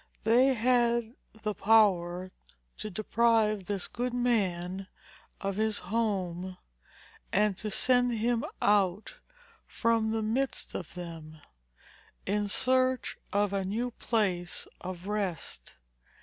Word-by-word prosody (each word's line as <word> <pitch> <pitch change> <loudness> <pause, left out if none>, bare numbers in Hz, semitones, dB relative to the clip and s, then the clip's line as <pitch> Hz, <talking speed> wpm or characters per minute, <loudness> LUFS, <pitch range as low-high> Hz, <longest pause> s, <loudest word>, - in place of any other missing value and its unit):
They 255 +4 +5
had 235 -1 +2 0.3
the 215 -1 0
power 185 -4 +3 0.5
to 215 - -4
deprive 215 0 +2
this 195 -1 -2
good 245 +1 -3
man 190 -6 0 0.5
of 195 0 -3
his 215 -1 +1
home, 185 -3 -2 0.7
and 210 0 +2
to 215 - -3
send 245 +2 +3
him 230 +1 +1 0.2
out 200 - +2 0.5
from 230 -1 +1
the 220 0 -1
midst 255 +5 -1
of 175 -1 -6
them, 165 -3 -8 0.9
in 205 +1 0
search 255 +3 +1
of 205 -1 +1
a 195 -1 0
new 225 +6 -2
place 190 -7 -1
of 180 -1 -6
rest. 200 -4 -4
210 Hz, 110 wpm, -30 LUFS, 185-230 Hz, 0.9 s, They